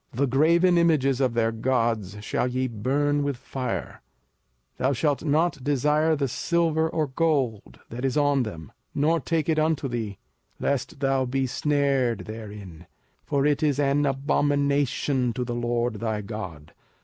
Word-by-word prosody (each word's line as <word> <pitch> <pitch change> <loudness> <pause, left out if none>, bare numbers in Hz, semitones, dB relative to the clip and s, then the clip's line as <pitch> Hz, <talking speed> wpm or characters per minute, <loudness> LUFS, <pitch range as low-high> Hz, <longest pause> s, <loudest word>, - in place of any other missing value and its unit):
05:007:025 - - -10
The 140 - +4
graven 170 +7 +4
images 140 -6 +2
of 130 -3 +2
their 115 -1 +2
gods 115 -4 -1
shall 110 - -1
ye 130 +1 -1
burn 140 +6 0
with 140 -3 -1
fire: 130 -1 -5 0.8
thou 130 +2 +1
shalt 145 +3 0
not 155 -2 +1
desire 150 +3 +2
the 140 -2 0
silver 160 +3 +1
or 160 -1 0
gold 135 -7 -1
that 120 +2 -6
is 135 +2 0
on 145 -2 +3
them, 80 - -6 0.2
nor 160 +4 +2
take 160 +1 -1
it 160 -1 +2
unto 155 -2 +1
thee, 115 -5 -4 0.4
lest 140 -1 -2
thou 135 -1 +2
be 135 +1 0
snared 135 -4 0
therin: 105 -6 -9 0.4
for 140 -1 0
it 150 -1 +2
is 145 -3 +2
an 145 0 +2
abomination 140 -2 +1
to 125 - -2
the 120 - -3
LORD 120 -1 -1
thy 110 -2 -2
God. 95 -8 -7
135 Hz, 155 wpm, -25 LUFS, 120-145 Hz, 0.8 s, The